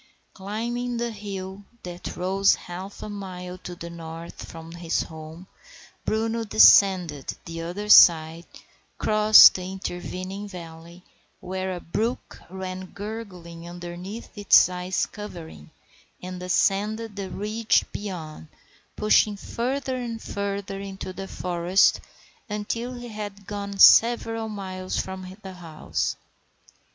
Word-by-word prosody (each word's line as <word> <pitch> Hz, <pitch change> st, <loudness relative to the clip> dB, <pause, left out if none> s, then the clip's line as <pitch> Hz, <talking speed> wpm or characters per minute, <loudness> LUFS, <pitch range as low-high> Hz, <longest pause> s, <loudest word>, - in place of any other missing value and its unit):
Climbing 235 Hz, +5 st, -3 dB
the 235 Hz, 0 st, -2 dB
hill 200 Hz, -2 st, -7 dB, 0.2 s
that 175 Hz, 0 st, -7 dB
rose 195 Hz, +2 st, +3 dB
half 185 Hz, +3 st, -8 dB
a -, -, -5 dB
mile 185 Hz, -3 st, -7 dB
to 175 Hz, 0 st, -8 dB
the 170 Hz, 0 st, -8 dB
north 165 Hz, 0 st, -8 dB
from 165 Hz, 0 st, -10 dB
his 170 Hz, -1 st, -1 dB
home, 160 Hz, +2 st, -10 dB, 0.6 s
Bruno 225 Hz, +1 st, 0 dB
descended 165 Hz, -, +5 dB
the 165 Hz, 0 st, -6 dB
other 180 Hz, +5 st, -5 dB
side, 165 Hz, -3 st, +7 dB, 0.5 s
crossed 215 Hz, 0 st, +8 dB
the 185 Hz, 0 st, -5 dB
intervening 185 Hz, +1 st, -5 dB
valley, 170 Hz, -1 st, -11 dB, 0.4 s
where 185 Hz, +1 st, -4 dB
a -, -, -6 dB
brook 225 Hz, +9 st, -3 dB
ran 185 Hz, 0 st, -6 dB
gurgling 185 Hz, -5 st, -8 dB
underneath 175 Hz, +6 st, -8 dB
its 205 Hz, -2 st, +6 dB
icy 180 Hz, 0 st, -2 dB
covering, 170 Hz, -, -9 dB, 0.5 s
and 180 Hz, 0 st, -7 dB
ascended 205 Hz, +4 st, 0 dB
the 195 Hz, -2 st, -5 dB
ridge 215 Hz, +3 st, +1 dB
beyond, 165 Hz, -7 st, -7 dB, 0.5 s
pushing 210 Hz, -1 st, +3 dB
further 260 Hz, +5 st, -3 dB
and 235 Hz, -2 st, -4 dB
further 200 Hz, -2 st, -4 dB
into 195 Hz, -1 st, -7 dB
the 195 Hz, +1 st, -7 dB
forest 180 Hz, +1 st, +2 dB, 0.5 s
until 230 Hz, +4 st, -3 dB
he 245 Hz, 0 st, -8 dB
had 205 Hz, -2 st, -7 dB
gone 200 Hz, 0 st, -5 dB
several 225 Hz, +1 st, +6 dB
miles 185 Hz, -3 st, -5 dB
from 190 Hz, 0 st, -5 dB
the 190 Hz, -1 st, -8 dB
house. 165 Hz, -4 st, -3 dB
190 Hz, 120 wpm, -25 LUFS, 175-210 Hz, 0.6 s, crossed